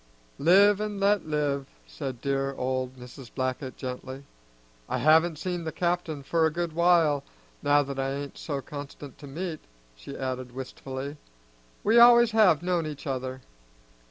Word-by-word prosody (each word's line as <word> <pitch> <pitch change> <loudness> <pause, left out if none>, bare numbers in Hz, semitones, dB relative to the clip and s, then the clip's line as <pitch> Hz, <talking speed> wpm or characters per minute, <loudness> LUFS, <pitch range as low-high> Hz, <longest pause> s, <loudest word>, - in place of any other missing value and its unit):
"Live 200 +6 +5
and 210 -1 -3
let 200 -3 +2
live," 145 -3 -1 0.2
said 115 - -6
dear 135 0 -1
old 130 0 -2
Mrs. 125 -1 -12
Blackett 130 0 -3
gently. 130 +1 -6 0.7
"I - - 0
haven't 160 +2 +4
seen 175 +1 -3
the 160 - -3
captain 170 -5 -2
for 165 +4 +1
a - - -2
good 170 0 -3
while, 165 -4 +3 0.4
now 145 0 +4
that 135 -1 -6
I 135 0 -1
ain't 140 0 -6
so 140 -3 -3
constant 145 -1 -9
to 145 - -10
meetin'," 160 +3 -5 0.4
she - - -9
added 130 -1 -4
wistfully. 135 +2 -6 0.7
"We 225 +3 +5
always 235 -1 +8
have 195 -8 +4
known 175 -3 0
each 150 0 -7
other." 130 -1 -4
145 Hz, 155 wpm, -27 LUFS, 130-175 Hz, 0.7 s, always